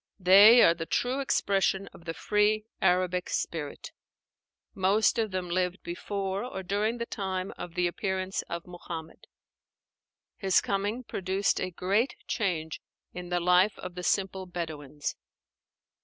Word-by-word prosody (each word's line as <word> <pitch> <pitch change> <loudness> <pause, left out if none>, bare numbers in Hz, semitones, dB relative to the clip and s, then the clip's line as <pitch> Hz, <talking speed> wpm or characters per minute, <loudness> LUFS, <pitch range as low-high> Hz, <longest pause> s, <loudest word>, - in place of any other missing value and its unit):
They 200 +6 +8
are 165 - +6
the 165 -1 -6
true 255 +2 0
expression 195 -7 +1
of 170 - -15
the 165 -1 -4
free 210 +1 +1 0.2
Arabic 180 0 +1
spirit. 150 -4 -4 0.8
Most 200 +5 +2
of 220 -1 +1
them 185 -1 -3
lived 180 +1 -1
before 195 +2 -3
or 215 -6 -6
during 210 +5 0
the 235 - -3
time 190 -4 -4
of 175 - -8
the 180 - +1
appearance 190 +1 -2
of 170 0 -5
Muhammad. 170 -2 -9 1.1
His 190 -2 +3
coming 205 +5 -2
produced 190 -2 -1
a 185 - -1
great 200 - 0
change 165 - -2 0.3
in 180 -1 -7
the 175 0 +1
life 180 +4 +3
of 180 - -7
the 180 - -6
simple 190 0 -1
Bedouins. 155 -5 -5
185 Hz, 140 wpm, -28 LUFS, 175-200 Hz, 1.1 s, They